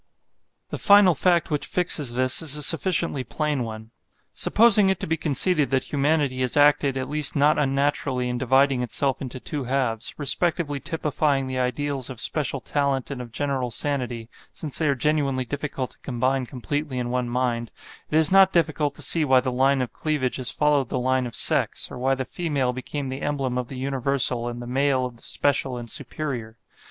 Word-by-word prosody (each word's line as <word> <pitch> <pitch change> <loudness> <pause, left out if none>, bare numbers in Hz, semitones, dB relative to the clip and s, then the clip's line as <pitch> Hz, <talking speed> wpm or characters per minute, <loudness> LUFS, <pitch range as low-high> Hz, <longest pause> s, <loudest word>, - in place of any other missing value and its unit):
The - - -4
final 200 -3 +6
fact 170 +2 +1
which 150 - -1
fixes 150 -8 +3
this 130 0 +2
is 155 -3 +2
a 150 - 0
sufficiently 165 -3 +2
plain 150 -1 -2
one. 110 0 -8 0.4
Supposing 210 -3 +5
it 190 - 0
to - - -2
be 160 - -1
conceded 155 0 +1
that 135 -1 0
humanity 145 -2 0
has 130 +2 -1
acted 145 -2 +3
at 130 0 -3
least 150 0 0
not 150 +1 +3
unnaturally 135 -2 0
in 125 0 -3
dividing 130 +1 +2
itself 135 +2 -1
into 130 -1 -6
two 145 +1 -4
halves, 125 -3 -2
respectively 150 0 0
typifying 150 -3 -1
the 130 0 -4
ideals 135 +1 -2
of 130 -4 -8
special 140 -1 -1
talent 140 0 -2
and 130 -2 -5
of 120 -2 -10
general 135 -1 -2
sanity 125 -3 -1 0.2
(since 150 -4 -1
they 155 - +1
are 140 - +1
genuinely 140 -2 0
difficult 140 -1 -5
to - - -17
combine 130 0 -2
completely 140 +2 -4
in 120 -1 -3
one 125 -1 -2
mind), 120 -2 -2 0.4
it 155 - +1
is 160 +1 +4
not 195 0 +6
difficult 155 -4 0
to 150 - -2
see 160 +5 +5
why 130 -3 +4
the 130 0 -2
line 135 +1 +2
of 125 - -7
cleavage 150 -5 -2
has 130 -2 +2
followed 145 -4 +1
the - - -2
line 130 0 0
of 120 - -6
sex, - - +1
or 125 - -8
why 135 +2 +1
the 130 0 -4
female 140 -7 -2
became 135 +2 -5
the 130 +1 -6
emblem 135 -4 -2
of 125 -1 -3
the 130 - -8
universal 130 -2 0
and 120 0 -6
the - - -8
male 130 +1 0
of 125 -2 -8
the - - -14
special 135 -3 0
and 120 -1 -7
superior. 120 -7 -5
135 Hz, 195 wpm, -23 LUFS, 125-150 Hz, 0.4 s, final